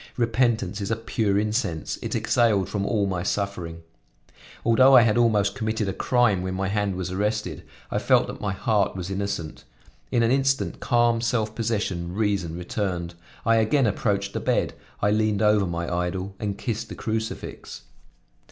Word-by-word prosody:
Repentance 115 -4 +1
is 100 - -3
a 115 - +1
pure 110 -2 0
incense; 105 -7 -1
it - - -3
exhaled 105 -6 +2
from 100 -1 -2
all 105 -3 +1
my 90 -3 -2
suffering. 90 -4 -3 0.8
Although 130 +4 +6
I 125 - +9
had 110 -2 +2
almost 110 -4 +3
committed 110 -3 -2
a 95 - -1
crime 120 -6 +2
when 95 0 -3
my 95 0 -1
hand 100 -2 0
was 90 0 -4
arrested, 105 +3 -2 0.3
I - - 0
felt - - +3
that - - -8
my 105 - -1
heart 105 0 +1
was 95 0 -5
innocent. 95 -5 -4 0.5
In 120 - +3
an 115 - +3
instant 135 0 +1
calm, 120 -1 +2
self 115 -2 0
possession, 100 -7 -2
reason 100 -6 -1
returned; 90 -1 -3 0.3
I 115 0 +4
again 115 +5 +3
approached 100 -5 0
the - - -2
bed; - - 0 0.3
I 100 - +4
leaned 110 -1 +1
over 105 -2 +4
my 85 0 -3
idol 90 +2 -2
and 100 -2 -3
kissed 115 -1 -3
the - - -7
crucifix. 110 0 -5
105 Hz, 170 wpm, -25 LUFS, 95-115 Hz, 0.8 s, I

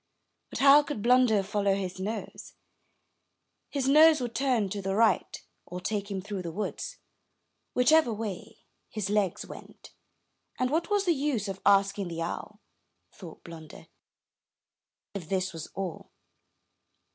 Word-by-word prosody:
But - - -6
how 280 +1 +7
could 290 -8 -6
Blunder 240 -4 +4
follow 200 0 0
his 185 -1 -5
nose? 215 +4 -6 1.1
His 275 -2 -2
nose 310 +2 +7
would 240 -2 -4
turn 250 -6 +1
to 200 +1 -4
the 195 0 -2
right, 225 +1 +2 0.3
or 180 +1 -6
take 205 +2 -3
him 195 -2 -3
through 200 -1 -5
the 170 -2 -5
woods, 215 - -5 0.8
whichever 250 +1 +4
way 210 -4 -6 0.3
his 205 -2 -3
legs 205 -4 0
went, - - -13 0.7
and 255 0 0
"what 325 +3 0
was 410 -1 +1
the 345 - +3
use 270 -8 -1
of 195 -1 -6
asking 200 -1 +3
the 165 -1 -4
owl," 210 +5 -6 0.5
thought 170 -5 -12
Blunder, 160 -2 -12 1.2
"if 180 -6 -7
this 190 -1 -1
was 165 -1 -7
all?" 190 -3 -5
205 Hz, 140 wpm, -28 LUFS, 190-255 Hz, 1.2 s, how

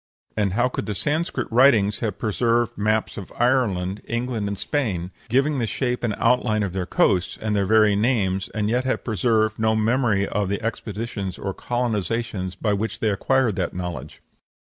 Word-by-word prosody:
And 100 -3 0
how 120 +4 +2
could 125 - -4
the 105 - -2
Sanscrit 150 - -1
writings 115 -5 +4
have 110 -5 -2
preserved 115 +1 +1
maps 110 +1 0
of 100 - -7
Ireland, 105 -7 +1
England, 115 -3 -2
and 100 0 -3
Spain, 95 - -2 0.2
giving 135 +4 +2
the 115 - 0
shape 125 +3 -2
and 110 -4 0
outline 115 -3 +2
of 95 -3 -3
their 95 -2 -3
coasts, 90 +3 +1
and 110 -1 -1
their 100 -2 +1
very 105 -1 +5
names, 100 -4 +1
and 105 -1 -2
yet 125 +3 +1
have 130 - -1
preserved 110 0 +1
no 110 0 +2
memory 110 -3 +2
of 105 -2 -1
the 100 - -1
expeditions 105 -3 -4
or 95 - -4
colonizations 115 -5 -2
by 105 -2 +1
which 105 +3 -2
they 110 - +1
acquired 120 +1 +1
that - - -2
knowledge? 85 -6 -6
110 Hz, 175 wpm, -23 LUFS, 100-120 Hz, 0.2 s, very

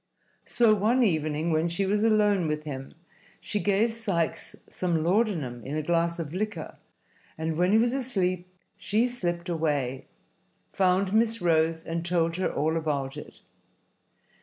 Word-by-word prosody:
So 230 -3 +4
one 220 +5 +2
evening, 155 -4 0
when 160 +2 +1
she 175 +4 -1
was 205 +2 +1
alone 210 -5 +3
with 150 0 -2
him, 135 -3 -7 0.4
she 210 - -2
gave 205 +3 +2
Sikes 195 -8 -2
some 170 -3 -1
laudanum 170 - 0
in 140 +3 -5
a 155 - -2
glass 170 +1 +1
of 160 -2 -5
liquor, 205 +3 -4 0.6
and 160 0 -2
when 180 +3 +2
he 215 - +5
was 235 +2 +2
asleep 185 -9 -1 0.3
she 220 +3 +1
slipped 175 -8 -3
away, 145 -6 -1 0.7
found 190 +1 +2
Miss 230 +1 +2
Rose 160 -2 +2
and 165 0 -3
told 170 -1 0
her 185 - 0
all 160 +2 0
about 140 -4 -2
it. 150 - -11
175 Hz, 150 wpm, -27 LUFS, 160-210 Hz, 0.7 s, he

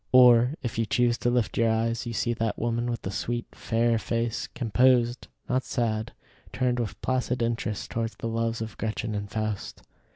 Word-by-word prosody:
Or, 125 +1 +7
if 115 -2 -3
you 115 - +1
choose 120 -1 +2
to 120 - +1
lift 120 -4 0
your 115 -1 +4
eyes, 115 +1 0
you 120 - -3
see 120 +1 0
that 115 -2 -1
woman 120 +1 -1
with 120 -2 -3
the 95 - -3
sweet, 120 +5 -2
fair 115 0 +1
face, 115 0 -2
composed, 120 +1 +3 0.2
not 130 +1 +1
sad, 110 -2 -1 0.4
turned 125 -1 0
with 115 -4 -3
placid 125 -1 0
interest 115 -3 -2
towards 115 -1 -2
the - - -7
loves 115 0 -1
of 110 - -9
Gretchen 110 0 -2
and 100 -1 -3
Faust. 110 -1 -4
115 Hz, 185 wpm, -27 LUFS, 110-120 Hz, 0.4 s, Or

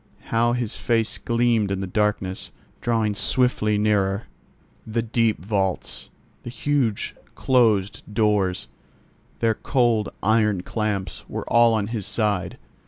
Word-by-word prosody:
How 120 +1 +3
his 120 -3 -2
face 115 -3 0
gleamed 115 -3 +1
in 95 -1 -1
the 95 - -2
darkness, 95 -1 -1 0.3
drawing 115 -3 +1
swiftly 105 -1 +2
nearer! 105 -1 +1 0.6
The 115 +1 -1
deep 115 -6 0
vaults, 95 -3 -1 0.3
the - - -7
huge 125 -4 -1 0.2
closed 110 -7 +2
doors, 105 -4 +1 0.7
their 115 -1 +3
cold 120 -3 +1
iron 105 -3 +2
clamps 105 -1 -3
were - - -5
all 115 -1 +5
on 105 -2 0
his 110 -2 -3
side. 105 -5 0
110 Hz, 120 wpm, -23 LUFS, 100-115 Hz, 0.7 s, all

